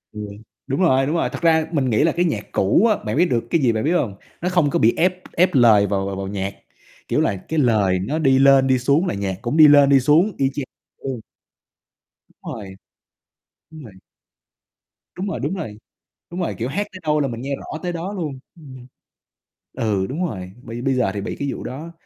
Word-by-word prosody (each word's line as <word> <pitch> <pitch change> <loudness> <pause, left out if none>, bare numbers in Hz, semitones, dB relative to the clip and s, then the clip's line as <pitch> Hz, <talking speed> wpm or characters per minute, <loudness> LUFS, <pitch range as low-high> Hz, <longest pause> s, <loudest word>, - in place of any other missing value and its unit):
Ừ. 105 - -5 0.5
Đúng 135 +8 -1
rồi, 135 -6 +3
đúng 155 - -1
rồi, 165 - 0
thật - - -7
ra 160 -1 +3
mình 135 -5 0
nghĩ 110 +6 +3
là 165 - +3
cái 175 +3 0
nhạc 110 -11 -2
cũ 100 - +3
á, 215 - +2
bạn 110 +6 -2
biết 175 - +5
được 120 -8 0
cái 165 - +1
gì, 125 -4 +3
bạn 110 - -2
biết 160 - +1
hông? 120 - 0 0.3
Nó 180 - 0
không 175 -5 +2
có - - 0
bị 115 +2 +4
ép 180 +1 +1
ép 180 +2 +3
lời 110 -5 +5
vào 100 -1 -1
vào 100 - -4
vào 95 0 -5
nhạc, 100 0 -3 0.6
kiểu - - +1
là, 100 - +1
cái 160 - 0
lời 105 -8 +2
nó 140 +12 -2
đi 135 -4 +3
lên 135 -1 +5
đi 130 -1 +2
xuống 140 +8 +2
là - - -1
nhạc 100 -2 -3
cũng 120 +5 -2
đi 155 -1 +9
lên 145 -1 +6
đi 140 -1 +6
xuống 155 +10 +3
y 135 -1 +1
chang 145 - -3 0.3
ừ. 135 - -6 1.2
Đúng - - -9
rồi. 95 -4 -9 1.0
Đúng 155 -2 -11
rồi. 110 -6 -12 1.2
Đúng 190 - -3
rồi, 155 - -4
đúng 145 +8 -2
rồi, 115 - -6 0.5
đúng 175 - -5
rồi, 170 - -2
kiểu, 115 - -2
hát 205 +9 -2
tới 185 - -9
đâu 150 -1 +1
là 140 - +1
mình 115 -2 -6
nghe 140 +1 -3
rõ 155 - -8
tới 175 -1 -2
đó 175 +4 -5
luôn. 155 -9 -5 0.2
Ừm. 130 -6 -13 0.9
Ừ, 100 -4 -1
đúng 165 +7 -2
rồi, 95 - -6
bây 115 0 -7
bây 135 0 +1
giờ 125 -6 +1
thì 100 - -3
bị 100 - -5
cái 140 - -3
vụ - - -7
đó, 155 +7 -7
135 Hz, 230 wpm, -21 LUFS, 110-160 Hz, 1.2 s, đi